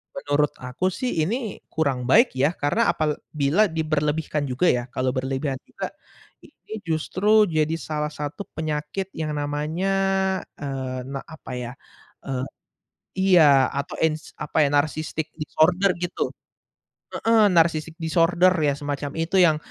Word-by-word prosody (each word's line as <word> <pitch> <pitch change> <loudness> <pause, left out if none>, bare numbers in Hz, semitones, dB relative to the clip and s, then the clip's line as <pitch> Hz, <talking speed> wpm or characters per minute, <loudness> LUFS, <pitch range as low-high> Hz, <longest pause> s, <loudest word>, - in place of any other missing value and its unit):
menurut 150 - +1
aku 125 +8 -2
sih 245 0 -2
ini 225 +2 -3
kurang 135 -6 -1
baik 235 - +6
ya, 145 +6 +2
karena 180 +11 +1
apabila 155 +4 +1
diberlebihkan 155 -2 -1
juga 130 +8 +1
ya, 120 -1 0
kalau 130 0 0
berlebihan 130 +1 -2
juga - - -6 0.5
ini - - -13
justru 190 +7 +3
jadi 155 0 +1
salah 150 0 -3
satu 150 +7 -5
penyakit 155 +5 -3
yang 155 -1 -3
namanya, 150 +6 -1 0.7
eee, 130 -2 -4
na 135 0 -4
apa 160 -4 -10
ya, 120 0 -5 0.5
eee 130 -1 -2 0.9
iya. 140 -5 +6
Atau 140 +1 -4
ins 155 -1 0
apa 150 +1 +2
ya, - - +2
narcissistic 155 +1 0
disorder 175 +5 +2
gitu. 175 0 -2 0.8
Heeh, 225 -1 +4
narcissistic 165 -1 +2
disorder 170 +3 +3
ya, 145 - +3
semacam 145 0 -4
itu 165 +4 -1
yang 160 -4 +5
155 Hz, 130 wpm, -24 LUFS, 145-170 Hz, 0.9 s, baik